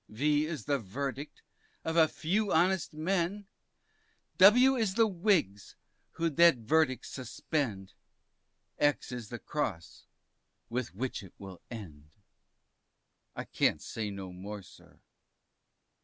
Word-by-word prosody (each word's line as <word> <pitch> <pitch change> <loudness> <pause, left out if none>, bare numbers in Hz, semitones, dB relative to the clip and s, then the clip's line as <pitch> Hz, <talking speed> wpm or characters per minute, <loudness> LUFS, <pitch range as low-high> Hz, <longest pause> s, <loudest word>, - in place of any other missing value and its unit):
V 150 +6 +1
is 155 -9 -5
the 140 -1 +1
Verdict 135 +7 -5 0.4
of 160 - -1
a 160 -2 +6
few 195 +7 -1
honest 180 +1 +2
men, 185 +4 -1 0.9
W 245 +8 +7
is 220 -6 0
the 225 0 +5
Whigs, 175 - 0 0.4
who'd 165 -3 -2
that 170 -5 +7
verdict 130 +2 +1
suspend, 120 -6 -3 0.9
X 145 -2 +1
is 120 -4 -6
the 120 - -5
cross 100 - -4 0.6
with 125 -5 -3
which 125 +5 -3
it 95 -3 -14
will 95 -3 -10
end. 80 -11 -9 1.3
I - - -4
can't - - +1
say 110 -2 -5
any 100 -1 -6 0.2
more, 100 +2 -7
sir. 90 - -18
145 Hz, 120 wpm, -31 LUFS, 105-170 Hz, 1.3 s, W